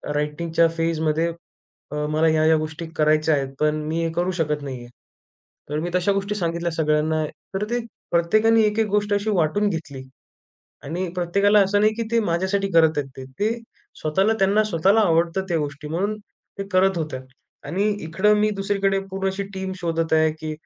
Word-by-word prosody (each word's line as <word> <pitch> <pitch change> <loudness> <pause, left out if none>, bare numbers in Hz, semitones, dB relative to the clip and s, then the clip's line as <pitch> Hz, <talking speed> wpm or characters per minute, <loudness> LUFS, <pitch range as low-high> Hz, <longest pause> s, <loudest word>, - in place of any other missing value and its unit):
रायटिंगच्या 160 +3 +1
फेजमध्ये 165 0 0 0.6
अ, - - -4 0.2
मला 155 +1 +2
ह्या, 155 0 +3
ह्या 160 0 +5
गोष्टी 155 +2 -5
करायच्या 155 0 +3
आहेत, 135 -1 -2
पण 150 0 +2
मी 165 +1 -1
हे 165 - -1
करू 175 +2 0
शकत 150 -2 0
नाही 130 -3 -5
आहे. 120 - -12 0.8
तर 150 +1 -1
मी 170 +3 -3
तशा 180 +2 +2
गोष्टी 200 +1 -2
सांगितल्या 170 -2 -2
सगळ्यांना. 155 0 +1 0.3
तर 195 - -1
ते 240 +1 0 0.3
प्रत्येकाने 215 +7 +3
एक 210 +1 +1
एक 220 - +2
गोष्ट 205 0 0
अशी 205 +2 0
वाटून 190 +4 +1
घेतली. 150 -6 -5 0.8
आणि 175 +6 -3
प्रत्येकाला 200 +4 +3
असं 205 +1 +1
नाही 215 +1 +4
की 230 - -1
ते 230 - +4
माझ्यासाठी 190 +3 0
करत 160 -2 +4
आहेत 140 -2 -2
ते. 130 - -7 0.2
ते 210 +2 +2 0.5
स्वतःला, 190 +8 +2
त्यांना 200 +3 +3
स्वतःला 195 +2 +3
आवडतात 170 -1 +2
त्या 170 -2 +1
गोष्टी 145 0 -5
म्हणून 195 +7 -1 0.4
ते 195 - -3
करत 185 0 +3
होत्या. 155 -5 -4 0.5
आणि 195 +7 0 0.2
इकडं 190 +6 +2
मी 215 0 +3
दुसरीकडे 195 0 +1
पूर्ण 195 0 -1
अशी 190 +1 -3
टीम 190 0 -4
शोधत 165 -2 -1
आहे 160 0 +4
की, 155 0 -4
170 Hz, 180 wpm, -23 LUFS, 155-195 Hz, 0.8 s, ह्या